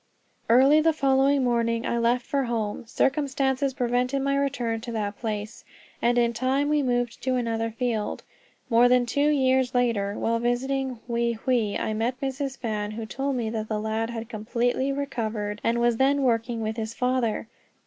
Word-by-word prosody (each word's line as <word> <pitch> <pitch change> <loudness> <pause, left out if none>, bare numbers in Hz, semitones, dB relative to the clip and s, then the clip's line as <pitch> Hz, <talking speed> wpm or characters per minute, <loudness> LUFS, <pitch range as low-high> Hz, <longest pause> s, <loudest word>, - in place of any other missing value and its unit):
Early 270 +6 +6
the 325 +1 +3
following 275 -1 +3
morning 230 -1 +1
I 235 - 0
left 240 +1 +1
for 275 -2 0
home. 225 -1 -3
Circumstances 270 0 0
prevented 250 +1 0
my 275 0 +1
return 250 -5 -1
to 235 - -6
that 205 -2 -3
place, 215 -1 -4 0.4
and 240 +1 +2
in 235 -1 +3
time 260 +5 0
we 300 -1 +2
moved 245 -2 -1
to 260 -1 0
another 230 -2 -1
field. 225 -2 -2 0.4
More 240 +1 +5
than 250 -1 +4
two 285 +5 +1
years 260 -3 +2
later, 215 -5 +1
while 230 0 0
visiting 260 +2 -1
Wei 235 0 0
Hwei, 225 -2 0
I 220 - -2
met 235 +4 -1
Mrs. 270 0 -3
Fan, 210 -3 -3
who 220 +1 -5
told 270 +5 -2
me 230 -3 -2
that 220 -1 -3
the 215 -1 -1
lad 220 +1 -2
had 230 -1 -5
completely 245 +4 -1
recovered 220 -7 -3
and 235 +1 +1
was 235 -1 +2
then 275 +2 +3
working 230 -1 0
with 220 +1 -3
his 225 0 -4
father. 250 -4 0
240 Hz, 175 wpm, -26 LUFS, 225-265 Hz, 0.4 s, Early